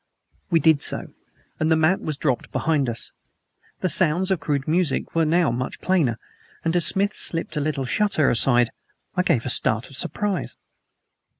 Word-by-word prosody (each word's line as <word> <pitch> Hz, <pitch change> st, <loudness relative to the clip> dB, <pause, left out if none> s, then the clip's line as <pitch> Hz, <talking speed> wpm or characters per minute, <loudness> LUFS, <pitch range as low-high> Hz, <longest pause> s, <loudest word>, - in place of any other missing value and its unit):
We 165 Hz, -2 st, +3 dB
did 155 Hz, -1 st, +3 dB
so, -, -, 0 dB, 0.5 s
and 155 Hz, +1 st, +1 dB
the -, -, +5 dB
mat 160 Hz, +5 st, +2 dB
was 155 Hz, -2 st, -4 dB
dropped 135 Hz, -4 st, -2 dB
behind 150 Hz, -5 st, 0 dB
us. 115 Hz, -1 st, -6 dB, 0.7 s
The -, -, +1 dB
sounds 185 Hz, +1 st, +1 dB
of 190 Hz, -, +1 dB
crude 145 Hz, -1 st, -2 dB
music 165 Hz, -2 st, 0 dB
were 165 Hz, -1 st, +2 dB
now 165 Hz, -2 st, +2 dB
much 125 Hz, +2 st, -4 dB
plainer, 155 Hz, -12 st, +1 dB, 0.5 s
and 165 Hz, +1 st, 0 dB
as 175 Hz, -, +4 dB
Smith 200 Hz, +2 st, +1 dB
slipped 165 Hz, -1 st, -2 dB
a 150 Hz, -, -1 dB
little 140 Hz, -2 st, -2 dB
shutter 160 Hz, 0 st, +1 dB
aside 120 Hz, -1 st, +4 dB, 0.4 s
I 180 Hz, -, +2 dB
gave 135 Hz, -10 st, +1 dB
a -, -, -2 dB
start 110 Hz, +2 st, 0 dB
of -, -, -8 dB
surprise. 195 Hz, +5 st, -2 dB
155 Hz, 175 wpm, -23 LUFS, 135-180 Hz, 0.7 s, the